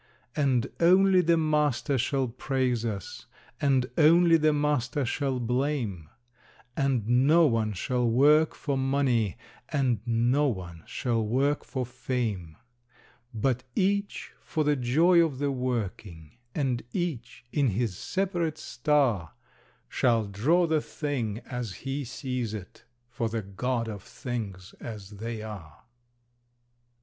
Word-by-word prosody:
And 135 -6 +2
only 185 +2 +5
the 170 -1 +3
Master 150 -3 +1
shall 135 +2 0
praise 125 -1 -1
us, 105 -5 -5 0.3
and 135 -3 +3
only 165 +2 +6
the 155 -1 +4
Master 145 -3 0
shall 130 +1 -1
blame; 120 - -1 0.7
And 130 -6 0
no 140 +8 +5
one 115 -5 +1
shall 120 +5 0
work 150 +6 +4
for 140 -2 -2
money, 130 -6 +1 0.3
and 130 -6 +1
no 120 +5 +2
one 90 - -5
shall 115 -3 -1
work 135 +7 +1
for 130 -2 -3
fame, 120 -9 -3 0.7
But 125 +2 0
each 200 +1 0
for 155 - -2
the 150 0 +2
joy 160 +8 +4
of 150 -5 -2
the 140 +1 0
working, 110 - -4 0.2
and 130 -5 0
each, 130 -10 -4
in 145 -3 +2
his 110 -2 -1
separate 175 - -2
star, 125 - 0 0.5
Shall 120 -4 +2
draw 135 - +2
the 160 -2 +1
Thing 125 -10 -3
as 125 -5 -5
he 135 +1 -2
sees 125 -3 -4
It 95 -4 -10 0.2
for 115 -1 -3
the 110 -1 -3
God 115 +5 -2
of 105 -3 -6
Things 100 -5 -6
as 105 -4 -8
They 110 +2 -5
are! 95 -8 -9
125 Hz, 125 wpm, -28 LUFS, 115-145 Hz, 0.7 s, only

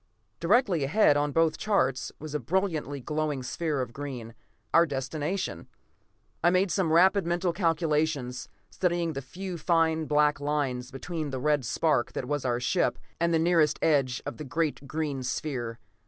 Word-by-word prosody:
Directly 190 - +3
ahead, 150 +2 +4
on 145 0 +1
both 165 +1 +2
charts, 135 -11 +1
was 155 0 -8
a 150 - 0
brilliantly 155 - -1
glowing 150 -1 -2
sphere 150 +2 -2
of 125 -2 -5
green 130 -5 -6 0.4
our 170 +1 +6
destination. 145 - -3 0.8
I 175 - +6
made 185 +1 +2
some 185 -5 +1
rapid 185 +2 +4
mental 175 0 0
calculations, 155 -7 0 0.2
studying 175 -2 0
the 135 - -4
few 180 +6 -6
fine 160 -1 +2
black 150 -1 +3
lines 140 -4 -1
between 155 +3 -4
the 135 - -4
red 145 -1 +1
spark 150 0 +1
that - - -3
was 145 0 -2
our 120 -1 +1
ship, 175 +8 +1 0.2
and 170 0 +2
the 165 - +3
nearest 160 -2 +3
edge 135 -6 +2
of 145 - -5
the 150 - -6
great 150 0 -2
green 150 -3 -2
sphere. 125 -3 -3
150 Hz, 160 wpm, -28 LUFS, 135-170 Hz, 0.8 s, our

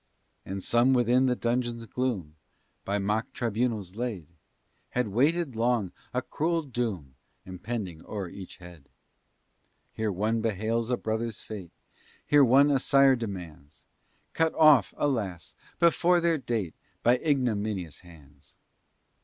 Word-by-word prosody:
And 95 0 -5
some 120 +3 +3
within 125 +1 +3
the 125 - +2
dungeon's 120 -1 -2
gloom, 110 -12 -3 0.5
By 100 +1 0
mock 105 +3 -1
tribunals 110 -4 -2
laid, 115 -9 -3 0.6
Had 125 -3 -1
waited 140 - +1
long 115 -4 +1 0.2
a 125 +1 -1
cruel 165 +4 -1
doom 110 - -4 0.3
Impending 95 -2 -5
o'er 100 -3 -4
each 95 +1 -10
head. 85 -5 -14 1.0
Here 110 -1 -1
one 110 +4 0
bewails 110 +2 -1
a 125 - +1
brother's 110 0 -3
fate, 100 -6 -8 0.6
There 145 -1 +7
one 135 +3 +5
a 135 - +3
sire 135 0 +5
demands, 90 - -8 0.5
Cut 165 -1 +1
off, 150 -9 +6
alas! 105 - -2 0.2
before 175 +1 +4
their 170 -2 +1
date, 110 -10 -2 0.3
By 120 +2 +5
ignominious 110 - -1
hands. 75 -5 -17
115 Hz, 125 wpm, -28 LUFS, 95-130 Hz, 1.0 s, There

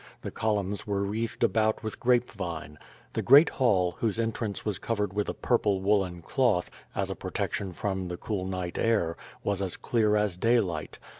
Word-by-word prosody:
The - - -4
columns 105 -2 -1
were 100 -1 0
wreathed 110 +3 -2
about 110 0 +2
with 110 - -5
grape 125 0 +2
vine. 85 -7 -6 0.3
The - - -1
great 145 +5 +7
hall, 95 -9 +2
whose 110 -3 0
entrance 115 -2 -2
was 105 -4 -2
covered 105 -4 -1
with 105 0 -1
a - - -3
purple 105 -5 +1
woolen 95 -3 +1
cloth, 120 -8 +1 0.2
as - - -1
a - - -3
protection 95 -2 -3
from 95 0 -3
the 90 0 -5
cool 95 -3 -3
night 90 -2 -3
air, 105 -8 +2 0.3
was 100 -1 0
as 95 -3 -3
clear 110 -3 +2
as 105 -4 +1
daylight. 95 -8 +1
105 Hz, 175 wpm, -28 LUFS, 95-115 Hz, 0.3 s, great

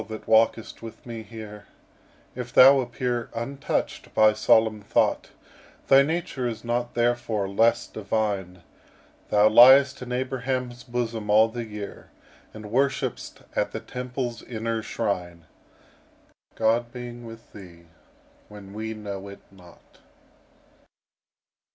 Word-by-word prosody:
that 110 -1 -8
walkest 115 0 +2
with 115 -1 -11
me 115 -2 -7
here, 110 -2 -10 0.7
If 125 -1 -7
thou 135 +3 +8
appear 120 -1 -3
untouched 135 +4 -3
by 110 0 +5
solemn 110 0 +3
thought, 100 - 0 0.6
Thy 135 0 +8
nature 155 -4 -2
is 115 -2 -6
not 120 0 -2
therefore 120 -4 0
less 110 +4 +2
divine: 100 -4 -3 0.7
Thou 105 0 +5
liest 130 +5 +7
in 125 0 -7
Abraham's 125 -1 -3
bosom 115 -3 -4
all 110 +2 +5
the 120 0 -5
year; 105 -2 -9 0.4
And 105 -1 -10
worship'st 135 0 -1
at - - -1
the - - -3
Temple's 125 -1 -5
inner 115 -1 -3
shrine, 90 -6 -4 1.1
God 115 +2 +1
being 120 -1 -8
with 115 0 -12
thee 85 -4 -13 0.6
when 100 -2 -12
we 110 +1 -5
know 100 -2 -7
it 100 0 -11
not. 90 -3 -19
115 Hz, 120 wpm, -25 LUFS, 105-125 Hz, 1.1 s, thou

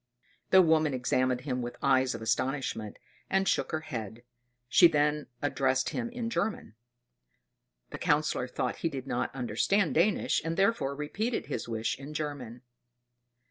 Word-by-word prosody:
The 190 -1 +7
woman 155 -4 +3
examined 125 0 +1
him 125 -2 -2
with 120 0 -6
eyes 130 -1 +2
of 110 - -7
astonishment, 115 -2 -1 0.3
and 195 0 +2
shook - - +1
her 155 -1 -1
head; 115 -6 -6 0.4
she 170 +7 +7
then 150 -1 +1 0.2
addressed 130 -2 +1
him 235 -1 -3
in 240 -1 -4
German. 210 - -2 1.2
The - - -6
Councillor 145 -4 +1
thought 125 - -3
she 165 - 0
did 135 -4 -6
not 120 -3 -1
understand 135 - +1
Danish, 185 +5 +2
and 165 0 -3
therefore 195 -9 +1
repeated 205 - -2
his - - -4
wish 110 +2 -2
in 145 +2 -9
German. 135 -6 -5
145 Hz, 145 wpm, -29 LUFS, 125-165 Hz, 1.2 s, The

